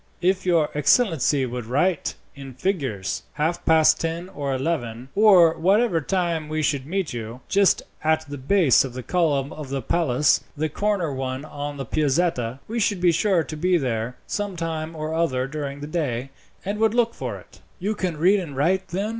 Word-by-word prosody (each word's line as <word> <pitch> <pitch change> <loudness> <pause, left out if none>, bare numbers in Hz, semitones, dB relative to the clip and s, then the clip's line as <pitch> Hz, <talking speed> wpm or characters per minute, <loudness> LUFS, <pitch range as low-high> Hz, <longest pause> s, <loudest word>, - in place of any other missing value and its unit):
"If 185 +1 +1
your 165 -4 +3
excellency 150 - +3
would 125 -2 -5
write 150 +7 0 0.2
in 135 -3 -10
figures, 130 - -2
half 160 +3 -1
past 160 -1 +5
ten 165 +2 -3
or 140 -5 -4
eleven, 130 -4 -2
or 190 -6 +6
whatever 195 0 +2
time 170 -2 -1
we 155 0 -1
should 140 -2 0
meet 185 -3 -2
you, 115 +1 -6
just 200 -3 +3 0.2
at 160 0 +1
the 145 -1 -7
base 155 0 +4
of 130 -3 -6
the 130 - -5
column 145 -5 0
of 150 -3 -8
the 135 0 -2
palace 150 -2 +2
the 155 +1 -1
corner 190 -3 -1
one 130 +1 -4
on 145 -1 -6
the 135 - -4
Piazzetta 140 -4 0
we 235 +2 -2
should 205 -3 +1
be 175 -1 +4
sure 180 0 +2
to 155 - -7
be 180 +3 +2
there 120 -4 -2
sometime 165 -5 -3
or 155 0 -4
other 135 -6 0
during 140 0 -5
the - - -4
day, 135 -5 -3 0.3
and 205 +2 -3
would 220 +1 +2
look 235 -1 +2
for - - -5
it." - - -17 0.2
"You 200 +4 -1
can 185 -6 -3
read 190 +6 +4
and 150 -7 -7
write, 185 +6 +1
then?" 195 +5 -2
155 Hz, 185 wpm, -23 LUFS, 135-180 Hz, 0.3 s, or